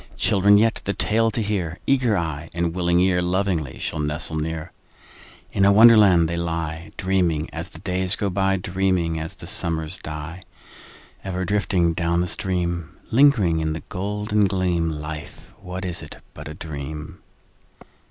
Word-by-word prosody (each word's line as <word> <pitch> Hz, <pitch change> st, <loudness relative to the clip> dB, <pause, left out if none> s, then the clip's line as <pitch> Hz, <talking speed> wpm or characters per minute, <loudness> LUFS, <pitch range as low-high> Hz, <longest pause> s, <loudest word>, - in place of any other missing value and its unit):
Children 100 Hz, +1 st, +4 dB
yet, 110 Hz, +1 st, +2 dB
the 100 Hz, -, 0 dB
tale 115 Hz, +2 st, +1 dB
to 110 Hz, +1 st, -2 dB
hear, 90 Hz, -5 st, -2 dB
Eager 125 Hz, -6 st, +2 dB
eye 80 Hz, -1 st, -3 dB
and 85 Hz, -1 st, 0 dB
willing 85 Hz, -1 st, +1 dB
ear, 90 Hz, -1 st, +3 dB
Lovingly 90 Hz, -6 st, -1 dB
shall 80 Hz, -, -3 dB
nestle 75 Hz, +1 st, -2 dB
near. 80 Hz, 0 st, -4 dB, 0.8 s
In 100 Hz, -, +1 dB
a 100 Hz, -, +6 dB
Wonderland 105 Hz, -6 st, +7 dB
they 85 Hz, +1 st, -3 dB
lie, 85 Hz, -1 st, -3 dB
Dreaming 90 Hz, -4 st, 0 dB
as 80 Hz, 0 st, -5 dB
the -, -, -10 dB
days 95 Hz, -1 st, 0 dB
go 100 Hz, -2 st, -2 dB
by, 95 Hz, +1 st, +1 dB
Dreaming 90 Hz, -3 st, 0 dB
as 80 Hz, +1 st, -6 dB
the -, -, -11 dB
summers 80 Hz, +1 st, -2 dB
die: 75 Hz, +4 st, -7 dB, 0.8 s
Ever 95 Hz, -1 st, -3 dB
drifting 90 Hz, -3 st, +1 dB
down 85 Hz, +1 st, 0 dB
the 90 Hz, -, +1 dB
stream— 85 Hz, -2 st, -2 dB
Lingering 115 Hz, -, +4 dB
in 80 Hz, 0 st, -1 dB
the 80 Hz, -, -6 dB
golden 105 Hz, +2 st, 0 dB
gleam— 90 Hz, -3 st, 0 dB
Life, 75 Hz, -1 st, -7 dB
what 95 Hz, 0 st, -6 dB
is 90 Hz, -1 st, -3 dB
it -, -, -10 dB, 0.2 s
but -, -, -9 dB
a 75 Hz, -, -7 dB
dream? 75 Hz, -1 st, -7 dB
90 Hz, 160 wpm, -23 LUFS, 80-95 Hz, 0.8 s, Wonderland